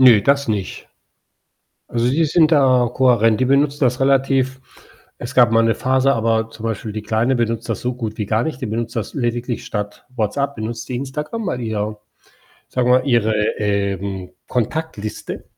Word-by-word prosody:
Ne, 120 -6 +7
das 140 +2 +2
nicht. 105 -4 -3 1.0
Also, 120 +1 0
die 160 +4 +2
sind 155 +1 +4
da 130 -5 +4
kohärent. 115 -4 +3
Die - - +3
benutzen 140 +2 +2
das 125 +1 +1
relativ 135 -1 +2 0.6
es 120 +2 -6
gab 120 -3 +6
mal 115 0 +5
'ne 115 0 +2
Phase 130 +1 +2
aber 115 -1 0
zum 110 0 -11
Beispiel 110 -1 -3
die 110 0 -5
Kleine 115 +5 +1
benutzt 115 -1 -1
das - - -2
so 125 0 -2
gut 110 -3 -5
wie 105 - -2
gar 110 +3 +1
nicht. 145 -3 -4
Die 130 - -3
benutzt 115 +2 -3
das 110 - -3
lediglich 120 -2 -2
statt 105 -1 -5
Whatsapp, 140 +5 -1
benutzt 110 +2 -5
die 125 - -3
Instagram, 150 - -4
weil 125 - -2
die 115 -2 -4
da 105 0 -2 0.7
sagen 125 -1 0
wir 125 - +7
mal, - - -9
Ihre 115 -4 +2 0.3
ähm, 100 -2 -2 0.2
Kontaktliste 125 -3 -3
120 Hz, 180 wpm, -20 LUFS, 110-130 Hz, 1.0 s, Ne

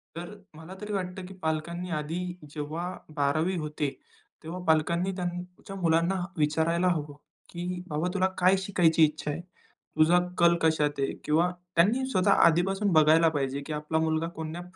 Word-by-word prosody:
तर 170 +1 -6 0.3
मला 160 +4 -10
तरी 210 0 -5
वाटतं, 185 -1 -4
की 190 - -10
पालकांनी 165 +3 -2
आधी 150 +3 -4 0.3
जेव्हा 155 +3 -4 0.3
12वी 155 +5 +1
होते. 150 -2 -2 0.5
तेव्हा 165 +3 -6
पालकांनी 170 +3 +2
त्यांच्या 180 +1 -6
मुलांना 170 0 +2 0.2
विचारायला 160 +3 +1
हवं, 150 -5 -1 0.4
की 180 +1 -5
बाबा 155 +2 -1
तुला 190 -1 +2
काय 185 +1 +4
शिकायची 175 -4 +3
इच्छा 150 0 -3
आहे? 155 +4 -5 0.6
तुझा 165 +3 +5 0.2
कल 170 -1 +5
कशात 150 -3 +1
आहे. 135 - 0
किंवा 165 +4 +2 0.3
त्यांनी 215 +10 +3
स्वतः 200 -4 +2
आधीपासून 195 +4 +3
बघायला 160 +1 +6
पाहिजे, 140 -2 -2
की 155 - -4
आपला 150 +1 -2
मुलगा 160 0 0
कोण्या 160 +2 -5
165 Hz, 150 wpm, -28 LUFS, 155-180 Hz, 0.6 s, बघायला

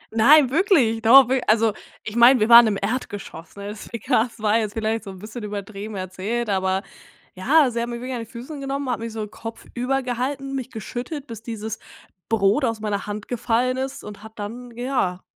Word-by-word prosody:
Nein, 260 +4 +6
wirklich. 280 - +3
Doch, 250 +3 +8
wir 260 -1 +2
also, 220 -1 +4 0.3
ich 215 - -6
meine, 240 +2 +7
wir 215 - +2
waren 235 -1 +10
im 200 -2 0
Erdgeschoss, 205 -7 -5
ne? 200 0 -7
Das 210 0 -9
we 235 - -5
ka 235 -1 +2
das 235 -2 -14
war 215 +1 +2
jetzt 210 -2 -3
vielleicht 220 0 -1
so - - -7
'n 190 - -11
bisschen 215 +3 -8
übertrieben 205 0 -6
erzählt, 195 +5 -3
aber 190 0 0 0.5
ja, 270 +7 +3
sie 235 0 -2
hat 235 - -3
mich 235 0 -5
wirklich 255 +1 -5
an 240 - -3
die 230 - -6
Füße 255 +6 -8
genommen, 275 0 -3
hat 235 - -2
mich 230 0 -5
so 220 -1 -4
kopfüber 245 +4 -4
gehalten, 270 +3 -3
mich 260 -1 -4
geschüttet, 250 +6 -6
bis 230 -5 -9
dieses 220 -2 -6 0.5
Brot 210 +4 +2
aus 230 -3 0
meiner 210 -1 -3
Hand 205 0 -5
gefallen 245 +1 0
ist 265 +1 -4
und 210 0 -10
hat 220 +1 -13
dann 235 +4 -7
ja, 240 -8 -1
230 Hz, 205 wpm, -23 LUFS, 210-255 Hz, 0.5 s, waren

